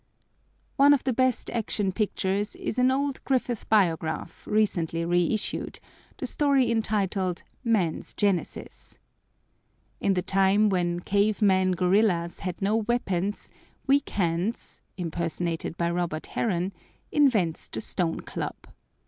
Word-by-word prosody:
One 285 +1 +7
of 280 - +1
the 260 - 0
best 255 0 +1
Action 210 -3 -1
Pictures 200 0 -1
is 235 - -3
an 250 +1 +5
old 275 +1 -1
Griffith 250 -4 -1
Biograph, 165 -6 0
recently 170 -6 +1
reissued, 175 +5 0 0.4
the - - -4
story 280 -4 +2
entitled 200 -5 -1 0.2
"Man's 205 -9 0
Genesis." 200 -4 -2 1.0
In 195 - +1
the 180 - 0
time 195 +2 +3
when 175 -2 0
cave 205 +3 +1
men 190 -3 +3
gorillas 180 -1 +2
had 180 +1 -4
no 210 +3 +2
weapons, 205 -4 -1 0.3
Weak 280 +1 +2
Hands 180 +4 -2 0.2
(impersonated 170 -1 -3
by 170 0 0
Robert 170 -3 -2
Harron) 185 -3 0 0.4
invents 220 - +2
the - - -5
stone 175 -6 -2
club. - - -5
195 Hz, 120 wpm, -26 LUFS, 175-225 Hz, 1.0 s, One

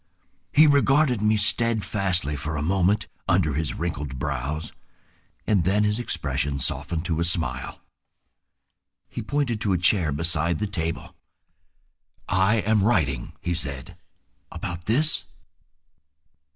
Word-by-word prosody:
He 155 +3 +6
regarded 140 -4 +3
me 110 0 +2
steadfastly 100 -7 +2
for 75 +2 -4
a 75 - -2
moment 95 +4 +1 0.2
under 75 - +2
his 75 +1 -2
wrinkled 75 -5 -4
brows, 70 +3 -4 0.7
and 100 -5 +2
then 100 +4 +2
his 105 +2 0
expression 70 - -2
softened 80 +5 -1
to 80 -2 -1
a - - +1
smile. 85 -1 0 1.3
He - - -6
pointed 135 -7 -2
to 100 -4 +1
a - - +2
chair 85 -2 +3
beside 80 +2 0
the 105 - -2
table. 85 -5 -4 1.1
"I 95 +4 +2
am 105 -1 +2
writing," 75 - 0
he 85 - -2
said. 70 -5 -5 0.6
"About 85 -1 -6
this?" 145 +9 +1
90 Hz, 125 wpm, -24 LUFS, 75-105 Hz, 1.3 s, He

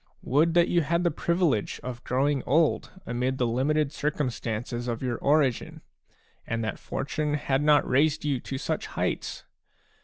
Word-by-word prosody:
Would 160 +6 +2
that 175 0 +5
you 175 - +2
had 145 - -6
had 170 +1 +2
the 175 - +2
privilege 170 - 0
of 125 -1 -6
growing 135 +2 +1
old 155 +4 +2 0.2
amid 125 +2 -1
the 125 - +1
limited 140 +5 +1
circumstances 120 -5 -3
of 120 +1 -3
your 125 -2 -2
origin, 140 -4 +1 0.7
and 115 0 -2
that 110 - -3
fortune 150 +1 -2
had 140 -2 0
not 150 0 +4
raised 150 +3 +2
you 140 -4 0
to 135 - -5
such 130 - -3
heights! - - -3
140 Hz, 160 wpm, -27 LUFS, 125-150 Hz, 0.7 s, that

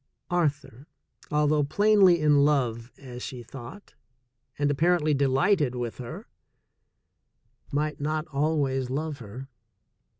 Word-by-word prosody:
Arthur, 145 -5 -1 0.4
although 150 0 +2
plainly 195 +2 +4
in 145 -2 +4
love, 125 -5 0
as 125 -3 -10
she 125 -2 -7
thought, 135 - -11 0.6
and 145 0 +1
apparently 155 +1 +2
delighted 140 +1 +2
with 120 -1 -4
her, 120 -2 -7 1.5
might 150 +1 -2
not 155 +1 -1
always 140 -3 0
love 150 +2 -3
her. 120 +4 -9
145 Hz, 105 wpm, -26 LUFS, 130-155 Hz, 1.5 s, plainly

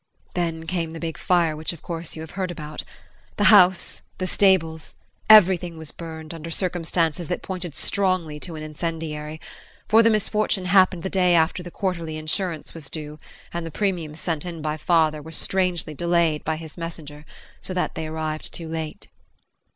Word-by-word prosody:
Then 165 -2 -2
came 165 -2 -2
the 165 - -6
big 165 -1 -3
fire 170 -4 +2
which 155 +3 -3
of 165 - -13
course 165 -1 -4
you 160 - -6
have 160 - -10
heard 185 -1 -2
about. 155 -3 -6 0.5
The 205 - +1
house, 185 -3 +5 0.2
the 185 - -2
stables 175 -4 +2 0.3
everything 180 -5 +7
was 160 -2 -6
burned, 160 -1 -8
under 165 0 -7
circumstances 170 -2 0
that 180 - -3
pointed 180 -5 -5
strongly 185 -6 0
to 170 +1 -6
an 155 - -6
incendiary, 155 -1 -4 0.5
for 220 +1 +6
the 230 - +5
misfortune 215 -2 +1
happened 185 -2 +4
the 190 - -2
day 180 -2 +4
after 165 +2 +2
the 175 - -8
quarterly 170 -4 -3
insurance 155 +1 -1
was 160 -4 -7
due 150 -1 -6 0.3
and 170 0 -2
the 165 - -5
premiums 170 -4 -2
sent 160 -4 -2
in 175 -2 -6
by 155 0 -2
father 155 -2 +2
were 160 +2 -10
strangely 180 -2 0
delayed 170 -1 +1
by 160 - -1
his 160 +1 -9
messenger 155 -3 -7 0.4
so - - -6
that 180 -1 -1
they 160 -1 -4
arrived 155 0 -3
too 165 - -6
late. 160 -1 -5
165 Hz, 175 wpm, -24 LUFS, 155-180 Hz, 0.5 s, everything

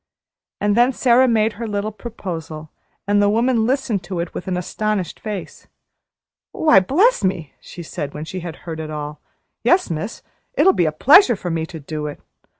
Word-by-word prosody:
And 205 0 +1
then 245 +3 +4
Sara 250 +1 +4
made 220 -2 +2
her 230 +2 -5
little 205 0 -2
proposal, 165 -8 -7 0.4
and 205 0 +3
the 205 - +4
woman 230 +1 +2
listened 255 -6 0
to 180 -1 -4
it 170 0 -4
with - - -7
an 180 -1 -1
astonished 205 +1 -2
face. 210 -5 -7 0.9
"Why, 305 -11 +5
bless 330 - +2
me!" 185 -6 -2
she 175 - -10
said, 145 -2 -6
when 150 +1 -5
she 185 +4 -6
had 170 -3 -7
heard 160 -2 -5
it 155 -1 -5
all. 150 -1 -6 0.4
"Yes, 360 - +3
miss, 165 +8 -5 0.3
it'll 385 -5 +5
be 170 - +2
a - - +1
pleasure 265 - +6
to 185 -3 -5
me 165 -1 -2
to 160 - -8
do 150 +1 -5
it. 145 - -7
195 Hz, 185 wpm, -20 LUFS, 160-230 Hz, 0.9 s, pleasure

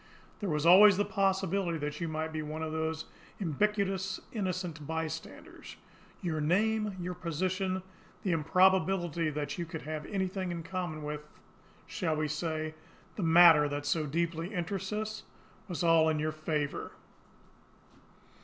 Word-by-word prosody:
There 205 - -2
was 150 0 0
always 190 +3 +8
the 205 - +2
possibility 190 -3 0
that 150 +1 -4
you 170 - -1
might 160 0 -3
be 155 - -2
one 155 +1 -5
of 160 - -3
those 160 0 -2 0.3
ubiquitous 195 +2 0
'innocent 180 - -3
bystanders.' 160 0 -6 0.5
Your 160 -3 -1
name, 210 +5 +1
your 180 +1 -3
position, 185 +2 -2 0.4
the 190 - 0
improbability 175 0 +2
that 150 +2 -4
you 170 - -2
could 165 -1 -6
have 155 0 -5
anything 190 -1 -2
in 170 -1 -4
common 175 -4 -4
with 150 0 -4 0.6
shall 160 -4 -1
we 155 0 0
say, 155 0 -3 0.4
the - - -4
matter 165 -3 +7
that 145 0 -4
so 150 +1 0
deeply 165 +3 -2
interests 190 +1 -3
us? 215 0 -3 0.5
was 175 -2 -3
all 165 -1 +5
in 155 - +1
your 155 +1 0
favour. 155 -2 -3
170 Hz, 145 wpm, -31 LUFS, 155-190 Hz, 0.6 s, always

